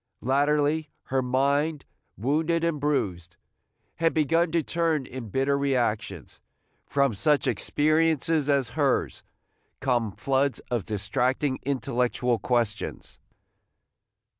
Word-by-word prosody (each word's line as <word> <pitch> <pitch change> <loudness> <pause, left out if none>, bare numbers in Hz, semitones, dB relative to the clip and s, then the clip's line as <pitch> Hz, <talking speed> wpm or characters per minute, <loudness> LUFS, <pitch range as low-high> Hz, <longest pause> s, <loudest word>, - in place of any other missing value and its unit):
Latterly, 145 +4 +1 0.2
her 135 - +3
mind, 140 +4 0 0.3
wounded 160 - 0
and 165 -3 0
bruised, 90 - -2 0.6
had 165 0 +1
begun 165 +2 +2
to 165 -1 +1
turn 165 -4 0
in 125 -4 -8
bitter 135 +6 +1
reactions. 115 - -1 0.5
From 140 -3 +2
such 145 +7 +2
experiences 155 - +1
as 140 -4 +2
hers 140 0 0 0.6
come 120 -5 0
floods 135 +3 0
of 120 -6 -1
distracting 125 +6 -1
intellectual 125 -2 0
questions. 120 -4 -2
140 Hz, 100 wpm, -26 LUFS, 120-150 Hz, 0.6 s, her